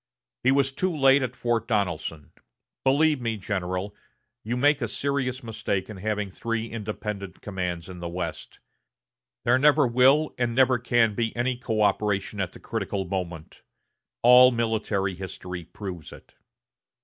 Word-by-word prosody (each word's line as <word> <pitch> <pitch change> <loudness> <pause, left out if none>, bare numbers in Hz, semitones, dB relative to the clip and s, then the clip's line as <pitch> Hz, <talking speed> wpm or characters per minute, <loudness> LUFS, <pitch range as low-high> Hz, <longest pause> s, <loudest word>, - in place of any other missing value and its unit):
He 130 - +4
was 135 0 +2
too 185 +7 -1
late 140 -3 +4
at 130 - -3
Fort 115 -2 -1
Donelson.... 90 - -2 0.5
Believe 145 +1 +3
me, 115 -2 -2
General, 95 0 -3 0.5
you 120 +3 -2
make 145 +2 +3
a 115 - 0
serious 130 +1 -2
mistake 110 -3 -3
in 105 - -8
having 105 0 -2
three 115 +3 -3
independent 105 -3 -5
commands 90 -4 -4
in 90 -1 -9
the 85 0 -5
West. 85 -1 -6 0.9
There 120 +2 +4
never 150 +1 +5
will 130 +5 +4
and 120 -1 0
never 130 -1 +4
can 115 -2 +2
be 115 +1 -2
any 125 +1 0
coöperation 105 -3 0
at 90 -2 -3
the - - -12
critical 95 -1 -3
moment; 85 -4 -5 0.6
all 125 +1 +9
military 110 -5 -1
history 90 -1 -7
proves 90 -6 -8
it." - - -15
110 Hz, 145 wpm, -26 LUFS, 95-125 Hz, 0.9 s, all